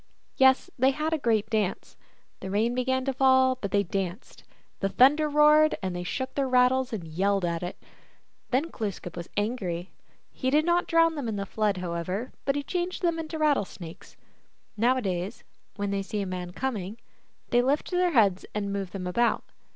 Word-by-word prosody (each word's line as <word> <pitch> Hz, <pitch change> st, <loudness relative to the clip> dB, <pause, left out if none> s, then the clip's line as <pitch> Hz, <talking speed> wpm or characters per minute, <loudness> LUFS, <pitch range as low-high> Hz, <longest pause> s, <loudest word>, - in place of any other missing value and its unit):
Yes, 265 Hz, 0 st, +4 dB
they 260 Hz, +2 st, +5 dB
had 305 Hz, +4 st, -1 dB
a -, -, +2 dB
great 225 Hz, -5 st, +1 dB
dance. 210 Hz, -4 st, -1 dB, 0.4 s
The 190 Hz, -, -6 dB
rain 220 Hz, +5 st, +1 dB
began 260 Hz, +1 st, 0 dB
to 270 Hz, -, 0 dB
fall, 260 Hz, 0 st, +4 dB
but 200 Hz, -, -2 dB
they 200 Hz, +1 st, +2 dB
danced. 190 Hz, +2 st, -5 dB, 0.4 s
The 195 Hz, -, 0 dB
thunder 295 Hz, +7 st, +4 dB
roared, 300 Hz, +1 st, +5 dB
and 185 Hz, -1 st, -2 dB
they 175 Hz, -, -3 dB
shook 260 Hz, +9 st, -4 dB
their 275 Hz, -1 st, 0 dB
rattles 255 Hz, +1 st, +3 dB
and 190 Hz, -8 st, -5 dB
yelled 195 Hz, +4 st, 0 dB
at 170 Hz, -1 st, -2 dB
it. 175 Hz, 0 st, -5 dB, 0.7 s
Then 280 Hz, +6 st, 0 dB
Glooskap 195 Hz, -5 st, -5 dB
was 170 Hz, -1 st, -7 dB
angry. 195 Hz, -5 st, -2 dB, 0.4 s
He 260 Hz, -, -2 dB
did 300 Hz, +3 st, +3 dB
not 345 Hz, 0 st, +2 dB
drown 330 Hz, 0 st, +4 dB
them 285 Hz, -6 st, -4 dB
in 220 Hz, -, -2 dB
the 200 Hz, -1 st, -3 dB
Flood, 210 Hz, -1 st, 0 dB
however, 180 Hz, +6 st, -3 dB
but 275 Hz, -, +1 dB
he 285 Hz, -, -2 dB
changed 355 Hz, +4 st, -3 dB
them 335 Hz, -1 st, +1 dB
into 320 Hz, 0 st, -5 dB
rattlesnakes. 200 Hz, -, -2 dB, 0.6 s
Nowadays, 220 Hz, -3 st, 0 dB, 0.3 s
when 205 Hz, -1 st, -2 dB
they 200 Hz, 0 st, -1 dB
see 205 Hz, +1 st, -3 dB
a -, -, -2 dB
man 180 Hz, -1 st, -5 dB
coming, 210 Hz, -2 st, -4 dB, 0.5 s
they 240 Hz, -, +4 dB
lift 275 Hz, +4 st, 0 dB
up 355 Hz, -, +2 dB
their 360 Hz, -2 st, +2 dB
heads 200 Hz, -7 st, +3 dB
and 200 Hz, -1 st, -2 dB
move 195 Hz, -2 st, -4 dB
them 190 Hz, -2 st, -5 dB
about. 235 Hz, +6 st, +1 dB
230 Hz, 185 wpm, -27 LUFS, 195-270 Hz, 0.7 s, they